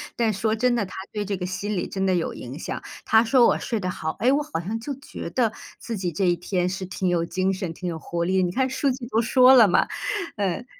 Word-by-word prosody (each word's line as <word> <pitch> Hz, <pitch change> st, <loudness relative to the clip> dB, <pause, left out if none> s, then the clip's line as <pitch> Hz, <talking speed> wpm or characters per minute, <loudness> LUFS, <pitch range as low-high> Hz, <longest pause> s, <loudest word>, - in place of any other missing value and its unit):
但 230 Hz, -2 st, +2 dB
说 215 Hz, +3 st, 0 dB
真 245 Hz, +2 st, +2 dB
的， 230 Hz, -4 st, 0 dB
它 185 Hz, -, -12 dB, 0.2 s
对 210 Hz, -, -2 dB
这 200 Hz, -1 st, -2 dB
个 180 Hz, -, -4 dB
心 200 Hz, +3 st, -3 dB
理 175 Hz, -, -2 dB
真 190 Hz, 0 st, -2 dB
的 190 Hz, -1 st, +2 dB
有 170 Hz, -, -1 dB
影 125 Hz, +3 st, -8 dB
响， -, -, -5 dB, 0.2 s
它 220 Hz, 0 st, +5 dB
说 240 Hz, +1 st, +5 dB
我 -, -, +3 dB
睡 230 Hz, -3 st, -2 dB
得 185 Hz, -2 st, -2 dB
好， 160 Hz, -3 st, -3 dB
诶？ 250 Hz, -, +4 dB
我 290 Hz, +2 st, +2 dB
好 295 Hz, -, -4 dB
像 205 Hz, +7 st, -4 dB
就 280 Hz, +5 st, -4 dB
觉 270 Hz, -, -8 dB
得 235 Hz, -4 st, +1 dB, 0.3 s
自 230 Hz, -1 st, -5 dB
己 180 Hz, -2 st, -2 dB
这 185 Hz, +5 st, 0 dB
一 175 Hz, -1 st, +3 dB
天 180 Hz, +1 st, -1 dB
是 185 Hz, +1 st, -3 dB
挺 185 Hz, 0 st, -3 dB
有 175 Hz, -2 st, +1 dB
精 185 Hz, +2 st, 0 dB
神， 185 Hz, -3 st, -4 dB
挺 180 Hz, +2 st, -6 dB
有 165 Hz, -, -4 dB
活 170 Hz, +2 st, -3 dB
力， 185 Hz, +1 st, +2 dB
你 175 Hz, -, 0 dB
看 260 Hz, +6 st, +1 dB
数 270 Hz, +1 st, +1 dB
据 250 Hz, -1 st, -6 dB
都 225 Hz, -2 st, +1 dB
说 255 Hz, +3 st, +6 dB
了 230 Hz, -4 st, +8 dB
嘛。 180 Hz, -, +3 dB, 0.5 s
呃， 200 Hz, +2 st, -2 dB
195 Hz, 285 characters per minute, -24 LUFS, 180-235 Hz, 0.5 s, 了